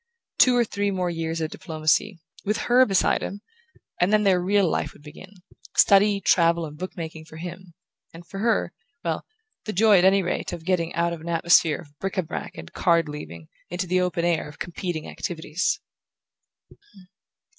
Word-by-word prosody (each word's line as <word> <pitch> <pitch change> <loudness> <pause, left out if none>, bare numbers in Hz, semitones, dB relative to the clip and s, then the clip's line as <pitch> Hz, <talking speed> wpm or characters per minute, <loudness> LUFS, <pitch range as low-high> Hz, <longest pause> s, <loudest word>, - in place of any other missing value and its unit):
Two 250 -1 +6
or 240 - +3
three 205 -1 -1
more 185 -2 -1
years 165 0 -3
of 160 0 -2
diplomacy 160 +4 0 0.3
with 210 +2 0
her 250 +2 +4
beside 195 -2 +2
him! 200 +1 -5 0.6
and 180 +3 +2
then 210 0 +4
their 190 -3 +3
real 195 +1 +2
life - - -1
would - - -19
begin: 150 +5 -12 0.5
study, 200 0 +5
travel 170 -3 +3
and 150 -1 -9
book 185 +5 -7
making 160 -1 -7
for 160 0 -12
him, 175 +1 -9 0.4
and 170 +1 -12
for 195 +3 -8
her 220 -5 +1 0.3
well, - - -3 0.4
the 215 - -3
joy, 210 0 +5
at - - +2
any 195 +1 +5
rate, 175 - -3
of 165 -2 -7
getting 175 -2 0
out 170 0 +1
of 165 - -7
an 170 - -7
atmosphere 165 -1 +3
of 145 -2 -19
bric 195 0 -4
a 185 - +2
brac 160 - -6
and 80 0 -10
card 170 -2 +2
leaving 85 - -8 0.2
into 180 +2 -3
the 185 +1 +1
open 175 -2 -1
air 170 -3 0
of 150 - -14
competing 175 -2 -4
activities. 165 0 -2
175 Hz, 185 wpm, -24 LUFS, 165-195 Hz, 0.6 s, Two